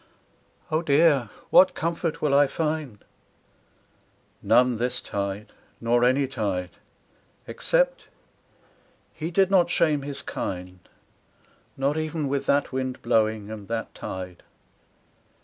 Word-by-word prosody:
'Oh, 155 +1 +2
dear, 145 -6 +3 0.2
what 185 - +6
comfort 165 0 -2
can 150 -2 0
I 140 0 +5
find 150 -7 -3 0.7
?' - - -38
None 125 -1 +4
this 125 +2 -1
tide, 100 +1 -4 0.3
Nor 120 +1 +2
any 130 +3 +3
tide. 100 -9 -3 0.8
Except - - 0 1.1
he 160 +1 -4
did 190 +2 +2
not 180 -3 +4
shame 155 -4 +2
his 140 0 -7
kind 90 0 -5 0.5
— - - -35
Not 140 +3 0
even 155 -1 -2
with 140 0 -2
that 145 0 +2
wind 130 -1 -3
blowing, 110 -2 +1
and 105 -3 -8
that 115 0 -4
tide. 90 -1 -7
135 Hz, 120 wpm, -25 LUFS, 110-155 Hz, 1.1 s, what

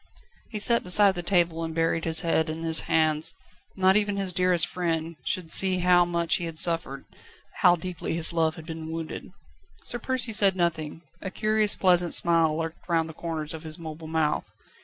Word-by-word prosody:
He 215 - -6
sat 235 +3 +5
beside 195 +2 +5
the 175 - -5
table, 175 -2 0
and 160 -1 -5
buried 165 0 0
his 160 -1 +2
head 160 -1 0
in 160 +1 -5
his 160 -1 +2
hands. 155 -1 +1 0.4
Not 190 0 +3
even 205 -1 +1
his 195 -2 -1
dearest 180 -2 +1
friend 165 -1 -3
should 170 -3 -3
see 190 0 +1
how 180 0 +3
much 170 -1 -1
he 175 - -5
had 165 -1 -7
suffered, 165 -5 -3 0.5
how 175 -1 +5
deeply 175 -1 -5
his 165 0 +4
love 160 -1 0
had 160 - -11
been 160 -1 -7
wounded. 165 -1 -7 0.5
Sir 240 - -4
Percy 250 -1 -2
said 200 -3 +3
nothing, 165 -2 -3 0.2
a 190 - -4
curious, 215 +1 0
pleasant 180 -2 +3
smile 165 -2 +3
lurked 165 +2 -6
round 165 -1 0
the - - -9
corners 160 -2 -6
of 160 - -8
his 155 -1 -8
mobile 160 -1 -9
mouth. 155 -1 -1
170 Hz, 190 wpm, -25 LUFS, 160-185 Hz, 0.5 s, sat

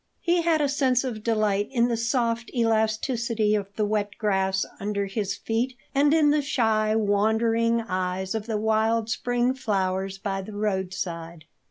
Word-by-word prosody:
He 345 0 +2
had 325 -2 +2
a 290 - +2
sense 265 -3 +2
of 235 -5 -4
delight 215 -3 +1
in 240 -2 +2
the 235 - 0
soft 230 0 0
elasticity 225 0 +1
of 205 -2 0
the 215 - +1
wet 205 -1 -2
grass 190 -2 +1
under 200 0 -2
his 195 0 -2
feet 245 +3 -2 0.2
and 285 +1 +3
in 305 -2 +4
the 300 0 +2
shy, 220 -6 +1
wondering 225 +2 +2
eyes 185 -2 -2
of 220 0 -4
the 220 -2 -1
wild 220 +1 +1
spring 245 +1 0
flowers 195 -5 -1
by 195 0 -3
the 205 +3 -9
roadside. 185 -5 -3
220 Hz, 160 wpm, -25 LUFS, 200-235 Hz, 0.2 s, in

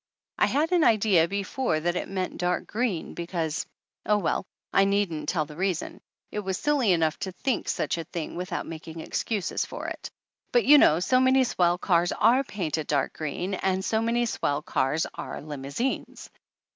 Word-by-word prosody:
I - - +5
had 310 +5 +1
an 350 -3 +4
idea 200 - +4
before 200 0 -1
that 175 +2 -1
it - - -3
meant 185 -1 -3
dark 180 0 0
green, 215 -7 -2
because 170 -2 -3 0.4
oh, 210 - +3
well, 190 -1 -1 0.3
I 195 - +5
needn't 195 -7 0
tell 155 -4 0
the 150 0 -11
reason; 180 0 -2 0.3
it 210 - -3
was 190 -2 -2
silly 285 -8 +2
enough 160 -3 +1
to 190 - -3
think 255 +7 -2
such - - -1
a - - -3
thing 160 0 -6
without 180 +1 -3
making 165 0 -8
excuses 200 +4 -2
for - - -7
it. - - -7 0.4
But 485 -2 +3
you 295 0 +8
know - - +8
THE - - +8
ANNALS 150 - +3
OF - - -1
ANN - - -3
so 255 +7 +3
many 260 0 +5
swell 175 -7 +2
cars 175 -1 +2
are 255 +4 +4
painted 165 - -3
dark 140 -2 0
green, 170 +5 -3
and 190 0 0
so 220 0 +1
many 235 +1 +1
swell 145 -9 -1
cars 150 +4 0
are - - -6
limousines 145 - -4
185 Hz, 195 wpm, -26 LUFS, 160-220 Hz, 0.4 s, you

